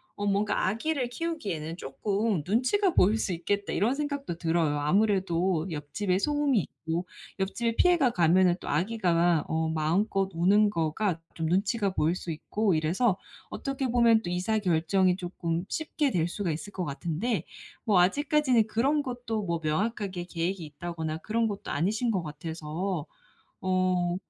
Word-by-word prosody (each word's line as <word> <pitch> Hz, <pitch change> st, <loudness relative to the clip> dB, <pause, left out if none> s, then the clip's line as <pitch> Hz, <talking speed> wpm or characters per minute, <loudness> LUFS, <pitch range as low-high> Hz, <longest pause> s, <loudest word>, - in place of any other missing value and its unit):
어 205 Hz, -, -3 dB
뭔가 200 Hz, 0 st, +1 dB
'아기를 250 Hz, +6 st, -1 dB
키우기에는 200 Hz, -, -4 dB
쪼끔 200 Hz, +3 st, -1 dB
눈치가 255 Hz, -, +2 dB
보일 210 Hz, +4 st, +4 dB
수 210 Hz, -, -1 dB
있겠다.' 200 Hz, +4 st, -2 dB
이런 235 Hz, +7 st, +2 dB
생각도 285 Hz, -, -3 dB
들어요. 160 Hz, -3 st, +1 dB
아무래도 185 Hz, 0 st, +1 dB
옆집에 180 Hz, +6 st, -1 dB
소음이 290 Hz, -3 st, +2 dB
있고 170 Hz, +1 st, -4 dB, 0.3 s
옆집에 230 Hz, +5 st, 0 dB
피해가 340 Hz, -9 st, +4 dB
가면은 180 Hz, 0 st, +4 dB
또 -, -, -10 dB
아기가 175 Hz, -2 st, +2 dB
어 160 Hz, 0 st, 0 dB
마음껏 190 Hz, +5 st, +1 dB
우는 200 Hz, +5 st, +4 dB
거가 165 Hz, +1 st, -1 dB
좀 160 Hz, -1 st, -2 dB
눈치가 200 Hz, +3 st, +1 dB
보일 165 Hz, -1 st, +1 dB
수 185 Hz, -, -7 dB
있고 200 Hz, +5 st, 0 dB
이래서 180 Hz, +7 st, +1 dB, 0.3 s
어떻게 275 Hz, -1 st, -3 dB
보면 230 Hz, -2 st, +4 dB
또 175 Hz, -, -5 dB
이사 185 Hz, +5 st, 0 dB
결정이 180 Hz, +1 st, +2 dB
쪼끔 175 Hz, -2 st, -3 dB
쉽게 305 Hz, -3 st, -1 dB
될 165 Hz, -2 st, +1 dB
수가 175 Hz, 0 st, -2 dB
있을 185 Hz, +7 st, -5 dB
것 185 Hz, -, -3 dB
같은데 170 Hz, -, -2 dB, 0.4 s
뭐 200 Hz, -5 st, +4 dB
아직까지는 260 Hz, -, +3 dB
그런 265 Hz, +8 st, +1 dB
것도 245 Hz, -4 st, -3 dB
뭐 170 Hz, -3 st, -1 dB
명확하게 190 Hz, +2 st, -1 dB
계획이 175 Hz, +1 st, -3 dB
있다거나 160 Hz, +1 st, -5 dB
그런 225 Hz, +4 st, 0 dB
것도 200 Hz, -2 st, -5 dB
아니신 210 Hz, -, 0 dB
것 190 Hz, -4 st, 0 dB
같아서 160 Hz, +2 st, -4 dB, 0.5 s
어 185 Hz, -1 st, +1 dB
190 Hz, 330 characters per minute, -28 LUFS, 165-225 Hz, 0.5 s, 보일